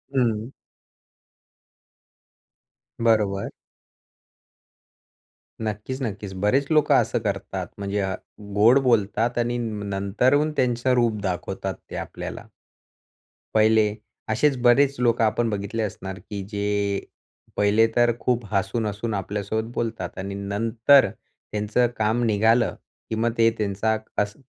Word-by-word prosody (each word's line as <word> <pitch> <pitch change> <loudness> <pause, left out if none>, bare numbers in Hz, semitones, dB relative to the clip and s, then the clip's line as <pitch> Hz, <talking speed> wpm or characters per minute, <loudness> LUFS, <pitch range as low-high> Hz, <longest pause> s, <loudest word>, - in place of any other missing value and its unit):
हं. 115 -2 +1 2.5
बरोबर. 105 -4 +2 2.2
नक्कीच-नक्कीच. 105 -2 -4
बरेच 135 +7 +2
लोकं 155 -1 +4
असं 115 0 +2
करतात 100 -3 -3
म्हणजे 100 0 -2
अ, 95 -1 -1 0.4
गोड 115 +6 +6
बोलतात 115 +1 +2
आणि 120 0 0
न 110 -3 -3
नंतरून 125 +10 +2
त्यांचं 125 0 +2
रूप 120 -3 +2
दाखवतात 95 0 -3 0.2
ते - - -7
आपल्याला. - - -7 1.1
पहिले 110 -1 +4 0.4
असेच 130 +5 +2
बरेच 135 +3 +4
लोकं 115 -1 +2
आपण 115 +1 +1
बघितले 105 +2 -2
असणार 95 -2 -5
की 100 -2 -4
जे 100 -1 -1 0.5
पहिले 105 +2 +4
तर 120 0 +4
खूप 120 -3 0
हसून-हसून 105 +3 -1
आपल्यासोबत 105 +3 -3
बोलतात 110 -6 -3
आणि 100 +1 -4
नंतर 115 +7 +3
त्यांचं 105 +4 -2
काम 110 +3 +1
निघालं 110 +2 +3 0.3
की 110 - -2
मग 115 +1 +1
ते 115 0 +5
त्यांचा 105 +1 0 0.2
अस्स 105 0 -3
110 Hz, 110 wpm, -24 LUFS, 100-120 Hz, 2.5 s, गोड